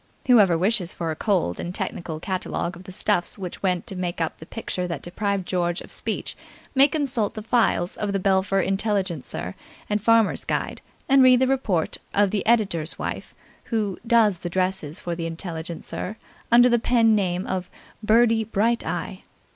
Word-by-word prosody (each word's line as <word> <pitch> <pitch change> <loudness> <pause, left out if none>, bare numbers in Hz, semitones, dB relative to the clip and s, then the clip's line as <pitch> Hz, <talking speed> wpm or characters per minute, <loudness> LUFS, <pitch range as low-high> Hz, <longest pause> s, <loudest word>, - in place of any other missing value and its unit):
Whoever 205 -9 +5
wishes 185 -1 +1
for 165 -2 -2
a - - -3
cold 180 - 0
and 175 +2 -5
technical 165 -3 -4
catalogue 180 -1 -3
of 180 +2 -13
the 185 - -9
stuffs 185 -1 0
which 185 -3 -7
went 180 -3 0
to 195 - -5
make 180 -1 -3
up 165 -1 -2
the 160 - -11
picture 185 -5 -4
that 170 -4 -5
deprived 200 +1 -2
George 175 -1 0
of - - -11
speech - - -3 0.4
may 275 +1 +6
consult 265 -8 -1
the 215 - -6
files 220 -6 +1
of 205 -1 -2
the 200 - 0
Belpher 195 0 +2
Intelligencer 190 - -1 0.3
and 210 0 0
Farmers' 230 0 +3
Guide, - - -2 0.3
and 275 0 +6
read 255 -1 +7
the 260 - +4
report 240 -11 0 0.2
of 205 -1 +3
the 205 - -1
editor's 195 -9 +2
wife, - - -5 0.3
who 210 -5 -2
"does" 220 -6 +4
the 175 - -5
dresses 185 -4 -1
for 175 - -4
the 165 -1 -3
Intelligencer 170 +4 -5 0.3
under 245 +1 +7
the 240 -1 +3
pen 230 -1 +3
name 185 -3 0
of 185 -1 -3 0.3
"Birdie 225 +1 +4
Bright 225 +3 +1
Eye". - - -4
195 Hz, 175 wpm, -24 LUFS, 175-225 Hz, 0.4 s, read